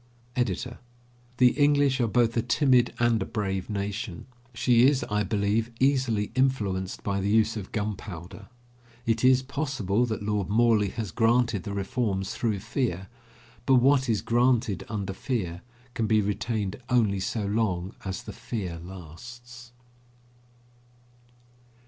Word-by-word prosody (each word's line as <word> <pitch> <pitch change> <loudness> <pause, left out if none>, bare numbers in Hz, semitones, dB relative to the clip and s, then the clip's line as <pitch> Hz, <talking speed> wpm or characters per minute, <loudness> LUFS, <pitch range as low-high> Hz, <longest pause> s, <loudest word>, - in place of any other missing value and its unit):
EDITOR: 125 0 -2 0.6
The 125 -1 +6
English 145 -2 +3
are 120 - +2
both 115 0 +2
a 115 - +2
timid 125 +1 +3
and 120 -2 +2
a - - +1
brave 95 -4 -3
nation. 100 -2 -4 0.3
She 120 +1 +4
is, 140 -2 +2
I 105 0 +1
believe, 105 +1 0
easily 130 -6 +1
influenced 105 -9 0
by 100 -1 -1
the 100 - -1
use 110 +1 +3
of 100 -4 -6
gunpowder. 100 -5 -5 0.6
It 115 0 0
is 130 0 +5
possible 130 -6 -1
that 110 -2 -3
Lord 105 -2 -1
Morley 110 -1 +3
has 110 -3 -5
granted 115 -3 +2
the 100 - -4
reforms 100 -1 -2
through 110 -5 -1
fear, 110 -5 -2 0.6
but 135 - +6
what 130 +1 +4
is 110 -3 +1
granted 120 -4 +2
under 100 -3 -3
fear 95 -6 -3 0.3
can 115 -3 -1
be 110 0 +4
retained 105 +1 -2
only 110 -6 +2
so 100 +3 -2
long 100 -3 -1
as 95 -1 -4
the - - -8
fear 105 -8 -5
lasts. 120 +8 -11
110 Hz, 135 wpm, -27 LUFS, 100-125 Hz, 0.6 s, The